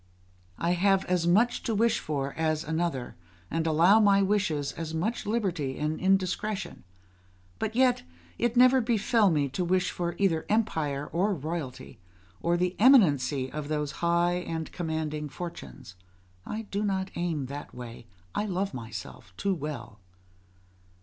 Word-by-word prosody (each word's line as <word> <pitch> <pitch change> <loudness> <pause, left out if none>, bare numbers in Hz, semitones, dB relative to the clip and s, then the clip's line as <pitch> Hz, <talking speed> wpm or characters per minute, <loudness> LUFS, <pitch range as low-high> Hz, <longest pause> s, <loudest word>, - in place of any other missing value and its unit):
I 170 - 0
have 195 +2 +3
as 180 -2 +1
much 225 +8 +3
to 225 - -2
wish 225 +2 +2
for 140 -2 -3
as 155 -1 0
another, 160 -6 -2 0.4
and 165 0 0
allow 170 +7 +5
my 200 -2 +5
wishes 190 -8 0
as 165 -1 -5
much 205 +7 -2
liberty 180 - -1
and 155 +1 -2
indiscretion; 195 +2 0 0.8
but 220 - -2
yet 255 0 +3 0.4
it 240 0 0
never 255 +1 +6
befell 225 -2 +3
me 150 -4 +1
to 180 +8 -2
wish 185 +1 +1
for 175 -1 -3
either 170 -5 +1
empire 160 -10 0
or 195 +4 +1
royalty, 155 - -6 0.4
or 170 +1 +1
the 180 +1 0
eminency 145 - +4
of 150 -1 -5
those 150 -1 -1
high 170 +1 +2
and 165 -3 -4
commanding 155 -3 -3
fortunes: 90 - -8 0.5
I 220 +1 -4
do 205 0 -3
not 195 -2 -1
aim 165 -5 -1
that 140 +3 -7
way; 120 -1 -9 0.3
I 210 - -1
love 195 +1 -2
myself 110 -5 -8
too 200 - 0
well. 140 - -6
170 Hz, 145 wpm, -28 LUFS, 150-200 Hz, 0.8 s, never